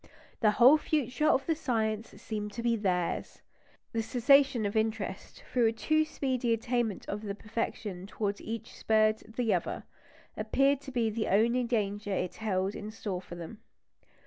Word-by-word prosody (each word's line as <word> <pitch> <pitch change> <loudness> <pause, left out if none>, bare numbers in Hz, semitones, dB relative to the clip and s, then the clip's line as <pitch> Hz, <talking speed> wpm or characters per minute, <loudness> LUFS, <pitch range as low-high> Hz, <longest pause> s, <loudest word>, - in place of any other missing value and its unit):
The 215 - +4
whole 260 +6 +8
future 295 -1 0
of 275 -2 +3
the 330 - +2
science 225 -7 -2
seemed 210 -2 -5
to 235 - -5
be 235 -1 +2
theirs. 180 -5 -2 0.5
The 225 - 0
cessation 265 0 +4
of 205 +2 -2
interest 220 - -2
through 245 -3 +4
a - - +3
too 310 +7 +1
speedy 255 -6 0
attainment 230 -2 -1
of 205 +1 -3
the 200 -2 -4
perfection 210 -3 -4
towards 205 -1 -2
which - - -12
each 225 -1 -5
spurred 215 0 +3 0.2
the 240 -2 +1
other, - - -2 0.5
appeared 275 0 +2
to 275 - -9
be 235 -3 +1
the 220 0 -2
only 235 +5 +3
danger 205 -3 -1
it 185 -2 -2
held 195 -3 -1
in 210 0 -6
store 205 -4 -4
for 175 -1 -10
them. 175 +6 -8
225 Hz, 170 wpm, -30 LUFS, 205-250 Hz, 0.5 s, whole